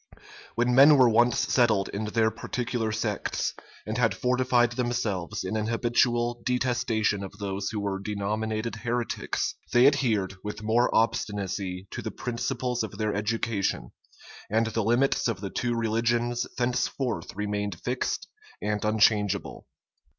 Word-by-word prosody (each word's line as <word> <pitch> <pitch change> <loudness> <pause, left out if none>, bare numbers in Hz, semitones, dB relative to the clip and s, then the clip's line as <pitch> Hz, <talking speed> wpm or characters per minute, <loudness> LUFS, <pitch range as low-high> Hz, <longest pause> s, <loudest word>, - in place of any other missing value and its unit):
When 120 +2 +2
men 140 +3 +8
were 130 -2 +7
once 120 +1 +4
settled 110 -6 +2
in 105 +2 -3
their 110 +1 +2
particular 120 -2 -3
sects, 110 -1 -2 0.3
and 110 +3 -3
had 115 -5 +2
fortified 125 0 +2
themselves 110 -6 -2
in 95 +4 -3
an 110 0 -1
habitual 120 0 +1
detestation 120 -5 0
of 95 - -7
those 100 -1 -3
who 110 - -3
were 100 -1 -2
denominated 110 +3 -2
heretics, 120 +1 -2 0.2
they 120 +1 +6
adhered 110 -10 +2
with 105 0 -6
more 115 +3 +3
obstinacy 100 -4 -1
to - - -5
the - - -4
principles 125 0 -2
of 110 -2 -5
their 110 -1 -1
education; 105 - -1 0.6
and 110 +2 +2
the 110 0 -1
limits 120 +6 +2
of 115 -5 -2
the 100 -1 -5
two 120 -1 -1
religions 120 +1 0
thenceforth 125 -1 -1
remained 105 -3 -3
fixed 125 +1 -2 0.3
and 105 0 -2
unchangeable. 105 -2 +1
110 Hz, 135 wpm, -27 LUFS, 105-120 Hz, 0.6 s, men